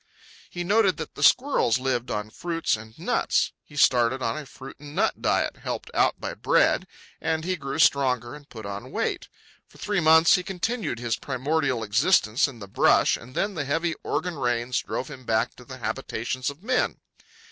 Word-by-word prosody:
He 175 - -4
noted 200 0 +3
that 160 - -6
the - - -9
squirrels 255 - +4
lived 125 -2 -1
on 105 -1 -3
fruits 165 +1 -1
and 110 +1 -12
nuts. - - +1
He 145 - -17
started 125 -2 +3
on 115 -3 -1
a 150 -2 -7
fruit 135 +1 -11
and 145 +1 -11
nut - - 0
diet, - - +1
helped - - -5
out - - +2
by - - -4
bread, - - +2 0.3
and 160 0 -1
he 185 +1 0
grew 140 -3 -5
stronger 130 -6 +2
and 145 -1 -12
put 110 -3 -9
on 100 0 -6
weight. - - -2 0.4
For - - -20
three 205 +1 -1
months 160 0 +6
he 180 - +4
continued 190 - -3
his 120 -1 -2
primordial 135 -2 -1
existence 115 - +3
in 135 -4 -10
the 100 -3 -9
brush, 95 - +4
and 125 +3 -12
then 205 0 0
the 150 -5 -3
heavy 165 +4 0
Oregon 180 -3 -2
rains 120 0 0
drove 130 - -4
him 135 -4 -10
back 110 -2 0
to - - -13
the - - -9
habitations 125 +4 -3
of 140 +6 -11
men. 255 +2 0
140 Hz, 190 wpm, -25 LUFS, 120-165 Hz, 0.4 s, months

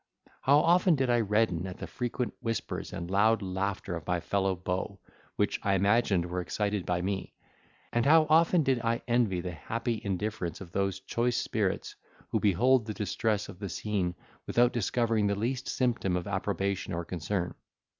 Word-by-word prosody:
How 140 +2 +5
often 175 +1 +4
did 130 -3 +1
I 120 - +4
redden 105 -5 +1
at 90 - -7
the - - -6
frequent 125 0 -3
whispers 115 -2 -3
and 85 +1 -5
loud 110 +2 +3
laughter 95 0 -2
of 80 -2 -7
my 90 -1 +1
fellow 95 +2 0
beaux, 90 +2 -3 0.4
which - - 0
I 100 -1 +2
imagined 100 -2 +3
were 90 +1 -3
excited 100 +2 -2
by 90 0 0
me; 95 0 -3 0.6
and 120 - +2
how 160 +1 +7
often 165 +2 +4
did 135 -3 +2
I 115 0 0
envy 115 -7 +2
the 90 0 -4
happy 115 +7 -3
indifference 100 -2 -3
of 90 -3 -10
those 95 0 -1
choice 120 +5 0
spirits, - - -1 0.3
who - - +1
behold 115 +5 +3
the 110 - -4
distress 105 0 -1
of 90 - -11
the 100 -2 -4
scene 90 -1 -2 0.3
without 120 0 +3
discovering 115 -1 +1
the 100 - +1
least 120 +5 -2
symptom 120 -8 0
of 90 - -4
approbation 100 -1 -2
or 85 0 -3
concern. 90 +1 -2
100 Hz, 175 wpm, -29 LUFS, 95-120 Hz, 0.6 s, how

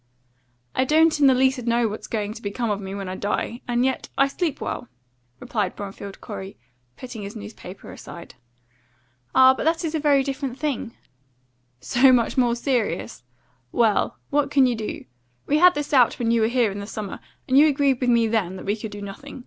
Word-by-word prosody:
"I - - +2
don't 310 +3 +3
in 285 - +6
the 260 - +5
least 260 0 +2
know 235 0 +2
what's 210 0 -6
going 210 -2 -3
to 225 - -11
become 215 +2 -2
of 205 0 -2
me 195 0 -6
when 195 -1 -5
I 185 - -4
die; 210 +4 -3
and 245 +1 +1
yet 265 - -2
I 275 - +4
sleep 315 +1 -2
well," - - -4 0.5
replied 205 -5 -2
Bromfield 200 0 -8
Corey, 190 +1 -8 0.4
putting 245 -4 -8
his 200 +2 -7
newspaper 205 -3 -10
aside. 170 - -11 1.0
"Ah! 260 0 +8
but - - -4
this 330 +2 +1
is 320 - -3
a 320 - 0
very 285 -2 +3
different 270 -2 -4
thing." 270 -6 -3 0.9
"So 260 - +4
much 240 -2 +2
more 245 -2 +2
serious? 240 - -2 0.5
Well, 225 -3 +1
what 290 -1 +2
can 280 -2 +4
you 250 - +2
do? 220 -1 -6 0.4
We 295 +2 +2
had 360 +1 +6
this 295 0 -4
out 250 -4 +5
when 230 -1 0
you 230 -1 +3
were 220 - +3
here 240 -3 +2
in 200 - -6
the 200 - -7
summer, 210 -3 -6 0.3
and 260 - +1
you 295 +3 +7
agreed 280 -3 +1
with 250 - +1
me 235 -1 +4
then 215 -5 0
that - - -9
we 200 +2 0
could 220 0 -7
do 205 0 -8
nothing. 230 +8 -9
240 Hz, 205 wpm, -23 LUFS, 210-275 Hz, 1.0 s, Ah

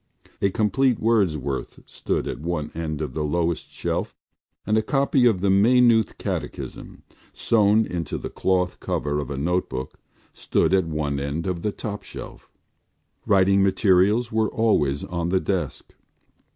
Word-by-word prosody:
A 100 - +3
complete 120 +5 +1
Wordsworth 85 - 0
stood - - -3
at - - -4
one 75 -2 -3
end 80 -2 -4
of 75 - -5
the 80 - -2
lowest 85 +2 -1
shelf - - -3 0.5
and 105 - +1
a 110 - +3
copy 135 +1 +2
of 100 -6 +1
the 100 0 +2
Maynooth 115 +2 +4
Catechism, - - -6 0.3
sewn 110 0 +3
into 85 -5 -4
the - - -6
cloth 90 -1 0
cover 75 0 -2
of 70 - -5
a 70 - -4
notebook, 80 -4 -2 0.3
stood - - 0
at 95 -3 +3
one 75 -3 -2
end 70 +4 -3
of 90 -3 -2
the 105 - -1
top 105 0 -6
shelf. - - -10 0.8
Writing 100 -1 +4
materials 100 +4 +3
were 110 -1 +1
always 75 -11 +1
on 85 -1 -3
the 95 +1 +2
desk. 95 -1 -3
95 Hz, 150 wpm, -23 LUFS, 80-110 Hz, 0.8 s, Maynooth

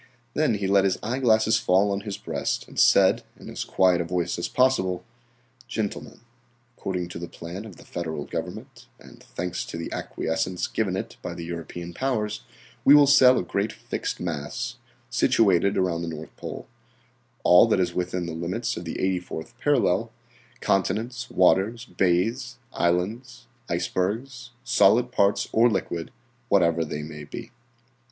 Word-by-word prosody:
Then 150 -7 +2
he 100 -1 -2
let 100 0 +4
his 95 -1 +1
eyeglasses 110 -2 +3
fall 100 -1 +3
on 100 - -1
his 100 -1 -5
breast - - -3
and - - -6
said - - +5 0.2
in - - -9
as - - -4
quiet 90 -2 +3
a - - 0
voice 85 0 -2
as 85 - -1
possible: 110 -9 +1 0.6
"Gentlemen, 110 -4 -4 0.5
according 90 -2 -3
to 85 - -7
the 85 - -5
plan 85 +6 -8
of 105 -5 -10
the - - -16
Federal 80 -4 -4
government, - - -7
and - - -16
thanks 90 0 -4
to - - -7
the 85 - -5
acquiescence 90 +3 -2
given - - -1
it - - -6
by - - -5
the 85 - -6
European 85 +1 -6
powers, 110 -3 -1 0.4
we 140 - +8
will 145 -1 +8
sell 130 -2 +7
a - - 0
great 100 +4 -1
fixed - - -5
mass, 90 - -4 0.3
situated 100 -5 +3
around 90 -3 +1
the 85 - -4
North 80 -1 -7
Pole, - - -7 0.8
all 90 +6 +7
that 110 - +2
is 90 -2 0
within 90 0 -2
the 85 - -5
limits 95 +9 -2
of 85 - -6
the 80 - -5
84th 90 -4 -2
parallel, 115 -6 +2 0.5
continents, 115 +6 0
waters, 100 +6 +2
bays, 115 +7 0 0.2
islands, 115 +9 -1 0.2
icebergs, 110 +9 -2
solid 120 0 +4
parts 100 -4 +2
or 120 +2 +5
liquid, 85 -6 -2 0.4
whatever 85 -4 +3
they 75 -1 -5
may 75 -1 -8
be." 70 - -8
95 Hz, 155 wpm, -25 LUFS, 85-115 Hz, 0.8 s, we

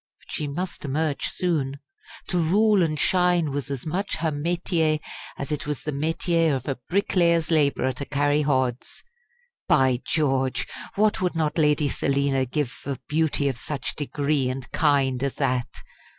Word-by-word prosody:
But - - -16
she 150 - -2
must 175 +5 -4
emerge 150 +1 -1
soon. 145 -7 -1 0.5
To 180 - +1
rule 200 +5 +4
and 155 -3 0
shine 180 -4 +2
was 140 0 -3
as 135 -4 -4
much 185 +6 -2
her 160 -1 -1
métier 160 0 0 0.4
as 140 +3 -5
it 150 -1 -3
was 150 -1 -3
the 150 - -2
métier 160 +1 +1
of 130 - -5
a 135 -3 -2
bricklayer's 170 -4 +2
labourer 140 -4 +2
to 130 +3 -6
carry 145 +1 +1
hods. 130 -4 -1 0.6
By 130 -2 +3
George! 135 -5 0 0.3
what 210 0 +2
would 180 -2 0
not 160 0 0
Lady 150 -1 +3
Selina 140 -1 0
give 145 0 -1
for 140 -1 -6
beauty 150 -2 +1
of 130 -4 -2
such 140 -2 -4
degree 145 -2 0
and 130 0 -6
kind 135 -4 +2
as 140 -1 -1
that! 125 -1 0
150 Hz, 160 wpm, -25 LUFS, 135-165 Hz, 0.6 s, rule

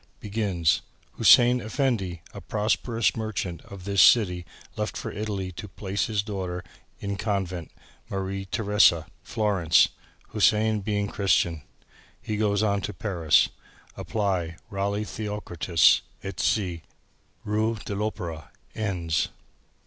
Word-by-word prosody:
Begins. 95 -7 0 0.3
Hussein 125 +1 +6
Effendi 110 - -1
a 100 - -8
prosperous 105 +4 0
merchant 105 -6 -3
of 100 -2 -10
this 100 -1 +2
city 90 -6 +5 0.3
left - - -3
for - - -5
Italy 100 -3 -3
to 100 +4 -8
place 100 +1 -2
his 105 -2 0
daughter 95 -4 -4 0.4
in 100 0 -3
convent 95 -5 -2 0.4
Marie 95 0 -3
Theressa, 105 -6 +3 0.2
Florence 100 -8 +3 0.4
Hussein 110 0 +3
being 105 0 -1
Christian. 85 -5 +1 0.6
He 110 - -4
goes 105 -1 +1
on 100 -2 +1
to 105 - -5
Paris. 85 -7 +3 0.5
Apply 95 -6 -2
Ralli 100 +1 -1
Theokritis 105 -7 +2 0.2
et 95 - -6
Cie., 90 -6 0 0.6
Rue 110 +2 0
de - - -4
l'Opera. 90 - -4 0.2
Ends." 85 -7 -1
100 Hz, 115 wpm, -26 LUFS, 90-105 Hz, 0.6 s, Hussein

